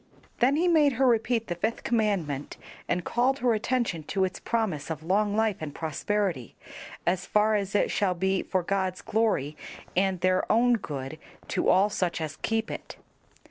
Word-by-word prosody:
Then 260 +4 +4
he 340 +4 +2
made 305 -5 +4
her 265 +3 +2
repeat 230 -1 +2
the 175 - -3
fifth 215 +7 -2
commandment, 195 - -1 0.3
and 175 0 0
called 255 +3 +1
her 245 -3 +2
attention 220 -5 -1
to 190 +3 0
its 185 - -5
promise 200 -12 -2
of 160 -1 -5
long 205 +4 +1
life 220 -2 +1
and 145 -2 -6
prosperity, 165 - -2 0.5
as 180 +1 0
far 210 +1 +3
as 200 -1 -1
it - - +2
shall 190 -3 +1
be 190 +2 +1
for 185 -1 -1
God's 190 0 -1
glory 205 -10 0 0.4
and 190 0 +1
their 185 0 +2
own 240 +2 +4
good, 145 - -4 0.3
to - - +1
all 200 +3 +4
such 180 -4 -1
as 155 -1 -4
keep 225 0 -1
it. - - -7
200 Hz, 175 wpm, -27 LUFS, 175-225 Hz, 0.5 s, Then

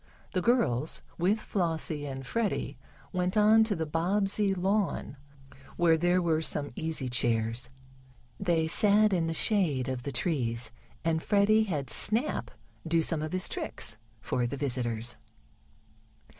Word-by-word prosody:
The 185 - 0
girls, 175 - +1 0.2
with 195 +6 +2
Flossie 160 -7 -2
and 135 -1 -6
Freddie, 225 - -1 0.4
went 180 +2 0
on 215 +1 +6
the 205 -8 0
Bobbsey 195 +6 +1
lawn, 190 -5 -1 0.6
where 170 -2 +5
there 175 +3 +2
were 160 -2 +1
some 145 -2 0
easy 160 -5 -1
chairs. 120 0 0 0.7
They 170 -4 +1
sat 210 +5 +4
in 170 -3 +1
the 165 - -1
shade 160 - +1
of 130 -1 -3
the 140 - -4
trees, 120 -5 -1 0.3
and 160 -1 +1
Freddie 210 +3 +3
had 145 - -3
Snap 230 +7 0 0.4
do 165 0 +2
some 160 -1 +1
of 155 - -3
his 185 0 0
tricks - - -4 0.2
for 120 -1 -1
the 140 - -4
visitors. 120 -3 -2
165 Hz, 135 wpm, -29 LUFS, 135-200 Hz, 0.7 s, on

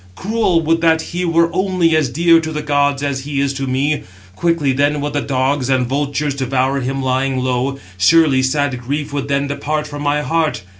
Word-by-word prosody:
Cruel! 190 - 0
would 165 +1 +1
that 160 -1 +3
he 180 +1 -2
were 170 0 +2
[only] 185 -3 +1
as 155 -5 +1
dear 165 +5 +4
to 160 -1 -4
the 150 -1 -4
gods 145 -1 +1
as 140 -2 -1
he 140 +1 -4
is 140 0 0
to 135 0 -4
me; 140 +4 0 0.3
quickly 165 - +1
then 145 +2 +1
would 145 0 -3
the 145 - 0
dogs 135 0 -1
and 130 -2 +2
vultures 145 +2 -1
devour 135 0 0
him 135 +1 -3
lying 130 +1 0
low; 130 +1 -1 0.2
surely 140 +5 +4
sad 130 0 0
grief 145 +3 -4
would 140 -1 -3
then 140 0 0
depart 150 +2 -3
from 145 0 -7
my 145 +1 0
heart. 160 - -1
145 Hz, 200 wpm, -17 LUFS, 135-155 Hz, 0.3 s, dear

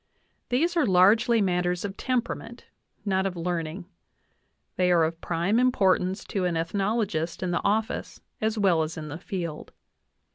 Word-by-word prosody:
These 330 +8 +1
are 335 - +3
largely 205 +5 +5
matters 180 0 0
of 195 -1 -5
temperament, 255 +1 -3 0.4
not 190 -1 +1
of 185 - -5
learning; 170 +1 -3 0.9
they 180 -1 +2
are 170 -2 +5
of 165 +1 -2
prime 175 +7 +1
importance 195 -6 +2
to 190 -3 -2
an 175 -2 0
ethnolo 200 +7 0
gist 165 -1 -3
in 180 - -1
the 170 - -1
office 215 +2 -1 0.2
as 220 +1 0
well 185 -6 +3
as 155 +1 -3
in 155 -1 -6
the 155 +3 -6
field. 170 -5 -5
185 Hz, 155 wpm, -26 LUFS, 170-215 Hz, 0.9 s, largely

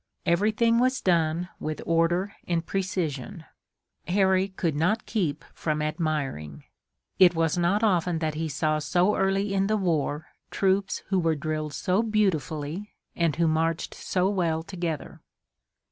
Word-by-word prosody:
Everything 215 +6 +3
was 255 +1 +2
done 170 -1 +1
with 155 0 -4
order 170 +4 +1
and 170 -1 0
precision. 170 -6 -3 0.6
Harry 190 +1 +3
could 175 -5 -2
not 200 +9 +1
keep 165 -9 -2
from 155 -1 -2
admiring. 150 - -2 0.6
It 175 -2 +7
was 165 0 +1
not 180 +5 +1
often 180 -5 +2
that 160 -1 -1
he 160 +1 -3
saw 155 +2 0
so 180 +6 +2
early 195 +1 +1
in 195 0 +2
the 215 +1 +1
war 160 -4 -1 0.2
troops 195 0 0
who 190 -1 +2
were 165 -2 +1
drilled 155 0 -3
so 185 +7 +1
beautifully, 190 - -1 0.2
and 165 -4 +1
who 165 +1 +2
marched 165 +1 0
so 185 0 0
well 170 -5 0
together. 170 -4 -5
170 Hz, 140 wpm, -26 LUFS, 155-195 Hz, 0.6 s, It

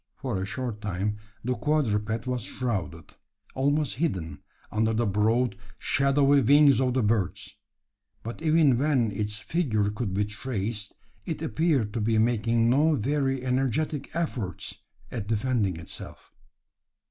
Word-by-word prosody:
For 120 -8 -3
a 95 - -3
short 115 -2 -4
time 105 +1 -2 0.3
the 125 +2 0
quadruped 115 -5 0
was 125 -1 -1
shrouded 95 - -4 0.4
almost 145 0 0
hidden 85 - -2 0.3
under 110 +1 +1
the 115 +2 +1
broad, 110 +3 +2 0.2
shadowy 140 0 +3
wings 140 +2 +6
of 130 -1 +1
the 130 - +2
birds; 105 -4 -1 0.7
but 115 +6 -6
even 155 -6 +4
when 135 -6 +2
its 105 +1 -2
figure 110 -7 0
could 105 -1 -3
be 105 +1 +2
traced, 105 -1 -4 0.3
it 165 -2 -3
appeared 155 -10 +1
to 115 - -1
be 110 +1 +2
making 115 0 +2
no 150 +6 +4
very 135 +1 0
energetic 135 +4 -1
efforts 130 - -3 0.4
at 110 -5 -4
defending 110 -4 0
itself. 80 - -10
120 Hz, 135 wpm, -27 LUFS, 105-135 Hz, 0.7 s, wings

